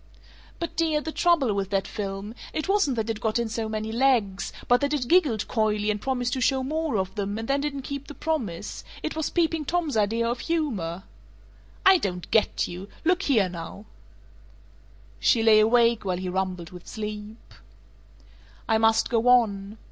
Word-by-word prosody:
"But, 335 - -5
dear, 320 -2 +1
the 315 +1 -5
trouble 315 -10 +2
with 195 -1 -2
that 195 -1 0
film 200 +1 -5 0.2
it 310 - -2
wasn't 390 -10 +2
that 225 -1 -2
it 215 - -6
got 220 0 0
in 235 -1 0
so 220 0 -3
many 215 0 -3
legs, 230 -6 +1 0.2
but 245 0 +4
that 285 +1 +1
it 250 -4 -2
giggled 290 - +3
coyly 215 -2 +1
and 205 0 -4
promised 250 -2 -1
to 260 - -2
show 265 +1 +2
more 310 -2 -1
of 190 -1 -2
them, 205 -1 -3
and 225 0 -5
then 275 +1 +1
didn't 280 -2 -3
keep 280 +1 -6
the 290 - -9
promise. 245 - -3 0.2
It 315 - -3
was 315 -2 -1
Peeping 325 -3 0
Tom's 330 -3 -1
idea 225 +2 +1
of 240 +1 -2
humor." 210 - -2 0.8
"I 380 -1 +7
don't 180 - -4
get 220 - +2
you. 180 +3 -8 0.2
Look 365 +3 +3
here 230 - +3
now 180 +4 -8 0.7
" 100 0 -28 0.3
She 225 - +3
lay 220 -1 +7
awake, 230 +1 +4
while 185 -2 -1
he 185 0 -4
rumbled 180 -2 -3
with 180 -1 -12
sleep 210 0 -7 1.1
"I 220 -1 +3
must 225 0 +3
go 235 0 +1
on. 215 -4 +3
225 Hz, 185 wpm, -26 LUFS, 200-280 Hz, 1.1 s, I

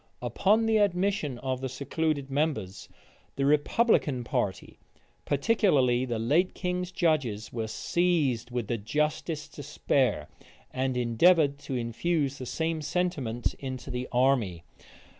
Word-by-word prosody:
Upon 215 +3 +2
the 225 -1 +3
admission 190 - +1
of 130 0 -3
the 130 - -3
secluded 140 +1 -2
members, 135 -10 -2 0.5
the 135 - 0
republican 145 - +2
party, 120 -7 -3 0.5
particularly 140 - +2
the 120 -3 -2
late 150 +12 +1
king's 180 0 -2
judges, 140 - 0
were 115 -2 -2
seized 150 -4 0
with 120 -2 -3
the 115 0 -2
justest 150 +6 -2
despair, 135 - 0 0.4
and 130 -1 -1
endeavored 140 +5 +3
to 135 - -5
infuse 140 +4 -1
the 130 - -6
same 160 +2 -2
sentiment 150 -8 -1
into 130 -1 -6
the 125 0 -3
army. 120 -9 +1
140 Hz, 120 wpm, -28 LUFS, 125-165 Hz, 0.5 s, the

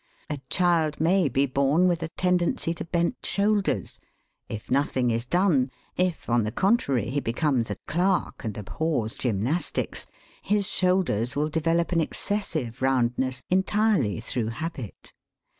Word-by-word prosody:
A 145 - -3
child 170 -4 +2
may 170 0 +3
be 135 +3 +2
born 140 +6 +2
with 175 -2 +1
a 165 - -2
tendency 180 -2 +1
to 170 - -6
bent 170 +7 -1
shoulders. 205 0 +1 0.5
If 110 +2 -7
nothing 130 -2 +1
is 115 +2 -2
done, 170 -6 +2 0.3
if 180 -2 -1
on 120 -1 +2
the 105 - -2
contrary 140 - +1
he 145 - 0
becomes 125 -1 0
a 105 - -2
clerk 180 0 0
and 110 -3 -4
abhors 110 - -2
gymnastics, 125 - -1 0.3
his 205 -1 +1
shoulders 180 - +1
will 150 +2 0
develop 165 +2 0
an 170 -2 +2
excessive 155 - -2
roundness, 130 0 +1
entirely 190 - +2
through 115 0 -2
habit. 135 - -6
150 Hz, 140 wpm, -26 LUFS, 125-180 Hz, 0.5 s, may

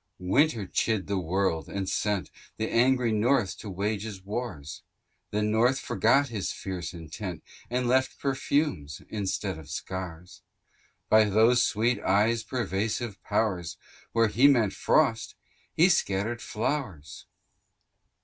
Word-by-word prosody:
Winter 110 - +2
chid 105 +1 0
the 100 -1 -1
world, 90 -1 -1
and 100 -1 -3
sent 105 0 -1 0.3
The 110 - -1
angry 125 0 +3
North 110 -1 +2
to 105 - -7
wage 100 +2 -2
his 105 -4 -7
wars: 100 - -5 0.5
The 105 +1 -1
North 115 +5 +2
forgot 140 -1 +2
his 105 -6 -3
fierce 95 -3 -5
intent, 85 +1 -7 0.3
And 125 0 -1
left 130 +2 +2
perfumes, 135 - -1
instead 100 -4 -3
of 75 -4 -13
scars: 90 +2 -6 0.7
By 110 0 +6
those 110 +4 +4
sweet 115 +3 +1
eyes' 110 +4 +2
persuasive 110 -2 -2
powers, 90 -7 -1 0.3
Where 115 -1 +3
he 125 +7 +5
meant 120 -8 +3
frosts, 115 -8 +1 0.4
he 170 - +6
scattered 115 - 0
flowers. 110 - -4
105 Hz, 125 wpm, -27 LUFS, 95-120 Hz, 0.7 s, By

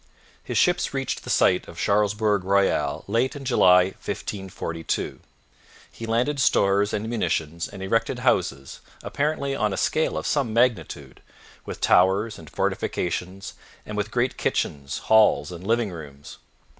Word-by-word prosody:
His - - -3
ships - - +2
reached - - -3
the - - -9
site - - +3
of - - -12
Charlesbourg 105 0 +1
Royal 100 +1 +1
late 115 +7 0
in 140 -1 -8
July 90 -7 +5
1542. 90 -4 -4 0.7
He 115 - -8
landed 125 +6 0
stores 100 -4 +3
and 105 +1 -3
munitions 85 -7 -2
and 100 -2 -9
erected 115 +4 0
houses, 70 0 -1 0.2
apparently 140 -2 -1
on 105 -6 0
a - - -4
scale 155 - 0
of - - -4
some 140 -6 0
magnitude, 120 -1 0 0.5
with - - -7
towers 95 +5 +3
and 80 -3 -12
fortifications 90 +5 -3 0.3
and 105 - -6
with 105 0 -2
great 125 +2 -1
kitchens, 70 -1 -2
halls, 105 -8 +4
and 90 +2 -8
living 115 -2 +1
rooms. 75 -4 -11
100 Hz, 140 wpm, -24 LUFS, 90-115 Hz, 0.7 s, July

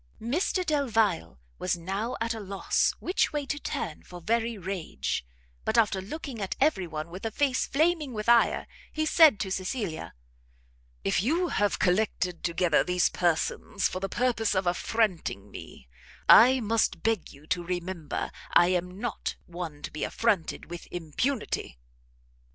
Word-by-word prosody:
Mr 340 - 0
Delvile 225 - +1 0.4
now 195 +7 -3
was - - -4
at 230 - -1
a 225 - -6
loss 195 -1 0
which 365 - +1
way 295 -2 -2
to 290 +2 -3
turn - - -4
for 180 - -11
very 230 +5 0
rage; 175 - -3 0.4
but 230 - 0
after 205 -4 +3
looking 250 +2 -6
at 195 - -2
every 245 - +2
one 155 +1 -5
with 185 +2 -8
a 225 - -1
face 260 +2 +1
flaming 310 -1 +1
with 215 -2 -5
ire, 235 0 +4 0.3
he 310 0 -1
said 310 -8 +6
to 190 - -3
Cecilia, 190 -2 -3 0.9
"If 100 - +2
you 335 - +1
have 205 -1 +1
collected 180 -2 0
together 170 -1 +2
these 180 -1 +2
persons 170 -3 0
for 185 - -4
the 195 +1 -3
purpose 235 -3 +1
of 190 0 +1
affronting 175 - -1
me, 65 - -11 0.4
I 255 +3 +8
must 225 0 +1
beg 225 -5 0
you 140 +1 -16
to 175 +2 -1
remember 175 -2 -3 0.2
I 175 - +6
am 180 +1 -1
not 240 - -3
one 170 -4 -7
to - - -5
be 150 - -4
affronted 210 -8 0
with 175 - -7
impunity!" 175 - -2
200 Hz, 155 wpm, -28 LUFS, 175-235 Hz, 0.9 s, I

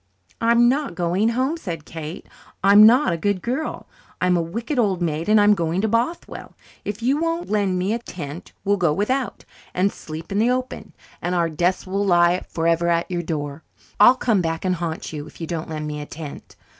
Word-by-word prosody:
"I'm 235 +1 +5
not 275 - 0
going 180 +6 +1
home," 260 +7 0
said 170 - -6
Kate. 160 0 -7 0.4
"I'm 205 +2 +8
not 245 -4 +4
a - - -2
'good 200 +3 0
girl' 265 +6 -3 0.3
I'm 180 0 +2
a 175 - +2
wicked 230 - -3
old 195 -6 +2
maid, 165 +1 -2
and 215 0 +6
I'm 205 0 +6
going 170 -2 -1
to 220 - +1
Bothwell. 235 +10 -2 0.3
If 210 +2 -5
you 265 +4 +2
won't 330 -4 -2
lend 200 -3 +1
us 195 - 0
a 230 - 0
tent 170 -7 -8
we'll 200 +1 +2
go 175 -5 +2
without 255 - -2 0.3
and 190 +2 +2
sleep 160 +2 -9
in 200 - 0
the 230 +3 +3
open 255 0 -3 0.3
and 180 +1 -1
our 170 -1 +1
deaths 175 +4 0
will 195 +2 -1
lie 175 -1 +3
forever 170 +1 +1
at 170 +1 0
your 175 -1 -1
door. 150 -3 -4 0.4
I'll 245 +5 +8
come 225 -6 +1
back 165 +1 -2
and 185 - +2
haunt 165 -1 -4
you, 150 0 -6
if - - -15
you 165 - -3
don't 160 -1 -4
lend 155 -1 -4
me 150 0 -4
a 145 - -8
tent. 150 -2 -9
185 Hz, 205 wpm, -22 LUFS, 165-230 Hz, 0.4 s, I'm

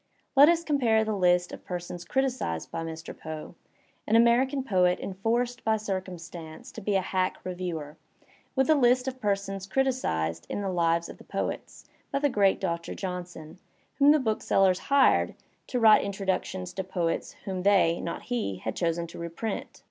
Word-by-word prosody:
Let 285 +3 +8
us 335 0 +2
compare 245 -8 +2
the 215 -1 -1
list 180 -2 +3
of - - -9
persons 175 -1 -6
criticised 255 - -1
by 165 - -3
Mr. 165 0 -7
Poe, 155 +1 -7 0.5
an 220 - +3
American 250 +4 +4
poet 180 -6 +2
enforced 235 +6 -1
by 220 0 +2
circumstance 185 0 -6
to 225 - -9
be 205 0 0
a 190 - +3
hack 185 0 -1
re 185 - -4
viewer, 165 -4 -5 0.6
with 265 0 +3
the 315 - +5
list 250 -2 +3
of 260 -1 -4
persons 195 -1 -2
criticised 80 - -1
in 205 - -3
"Lives 170 -3 +1
of - - -11
the - - -13
Poets" - - -5 0.3
by - - 0
the 290 +1 +2
great 200 -5 +3
Doctor 170 -3 -3
Johnson, 180 -3 -6 0.4
whom 280 +1 +6
the 300 - +7
booksellers 195 -6 +2
hired 280 -1 +4 0.3
to 250 - -1
write 220 -2 +7
introductions 190 -2 -3
to 190 - -3
poets 175 -3 -2
whom 190 -2 -3
they, 185 -4 +3
not 170 - -5
he, 235 - -2
had 110 +4 -5
chosen 170 -1 0
to 170 - -10
reprint. 170 +6 -5
190 Hz, 170 wpm, -27 LUFS, 170-240 Hz, 0.6 s, Let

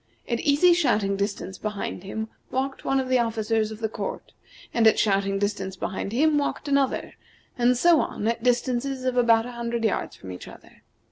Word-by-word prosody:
At 235 -1 -1
easy 300 +5 +4
shouting 220 - +2
distance 200 -1 -3
behind 210 -4 -4
him 220 +3 -4 0.2
walked 265 +1 -2
one 270 0 +1
of 260 - -2
the 255 -1 +3
officers 225 -1 0
of 220 +1 -9
the 220 - +1
court, 215 - -6 0.4
and 230 -1 +4
at 220 - +5
shouting 195 -1 +1
distance 195 -2 -2
behind 190 +1 -4
him 295 +5 +3
walked 285 - -3
another, 280 -1 0 0.4
and 245 0 +3
so 340 +4 +5
on 210 - -3
at 230 0 0
distances 250 +2 0
of 255 -1 0
about 230 -2 +4
a 245 - -6
hundred 235 -1 -3
yards 215 - -1
from 95 - -10
each 90 - -9
other. - - -15
235 Hz, 190 wpm, -25 LUFS, 210-260 Hz, 0.4 s, at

